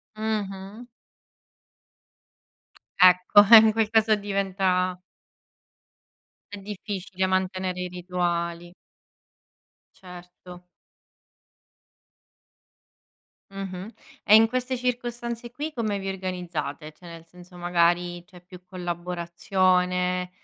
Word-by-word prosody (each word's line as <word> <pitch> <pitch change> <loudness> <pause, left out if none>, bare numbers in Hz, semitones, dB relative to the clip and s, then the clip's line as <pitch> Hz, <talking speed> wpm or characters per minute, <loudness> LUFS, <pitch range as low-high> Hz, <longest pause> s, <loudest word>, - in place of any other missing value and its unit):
Mh-mh. 210 0 -5 2.2
Ecco, 185 +3 +6
e 230 - +11
in 220 0 +6
quel 220 -1 0
caso 220 -1 +3
diventa 190 -2 -1 1.5
È 205 - -7
difficile, 195 -2 -4
mantenere 185 -1 -2
i 180 - -3
rituali. 175 -1 -3 1.2
Certo. 180 0 -13 2.9
Mh-mh, 195 +1 -7 0.3
e 210 - +6
in 225 +1 +6
queste 255 +2 -2
circostanze 240 -1 -4
qui 300 +5 -6
come 215 -4 -2
vi 195 0 -6
organizzate? 180 -5 -5
Cioè 175 +3 -17
nel 165 -1 -11
senso 180 +1 -16
magari 175 0 0
c'è 180 -2 -17
più 180 0 -15
collaborazione, 180 +1 -1
185 Hz, 85 wpm, -25 LUFS, 180-205 Hz, 2.9 s, e